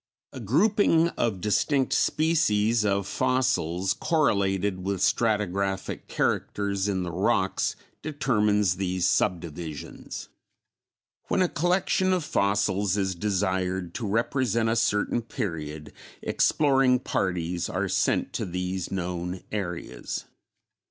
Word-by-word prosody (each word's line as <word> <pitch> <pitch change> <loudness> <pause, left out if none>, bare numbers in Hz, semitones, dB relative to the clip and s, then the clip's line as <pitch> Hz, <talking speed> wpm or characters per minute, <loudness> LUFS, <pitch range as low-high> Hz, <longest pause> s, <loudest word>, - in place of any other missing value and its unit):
A - - -7
grouping 165 - +3
of 110 - -2
distinct 130 +6 +1
species 115 -9 +2
of 100 -1 +1
fossils 120 -9 +1
correlated 100 - +1
with 100 0 -1
stratigraphic 100 -3 0
characters 100 -1 -1
in 95 -2 0
the 90 - -4
rocks 95 +2 +1 0.3
determines 105 - +1
these 90 -2 -1
subdivisions. 85 -5 -2 1.0
When 185 - +2
a - - +2
collection 180 +3 +1
of 180 -3 0
fossils 100 -4 +1
is 95 -1 0
desired 95 -2 -1
to 115 - -3
represent 115 +1 +1
a 115 - +1
certain 110 +1 +1
period, 80 - -5 0.3
exploring 135 -4 +3
parties 90 -7 -2
are - - -1
sent - - 0
to - - -2
these 90 0 -3
known 90 -1 -3
areas. 90 -5 -4
100 Hz, 105 wpm, -26 LUFS, 90-125 Hz, 1.0 s, grouping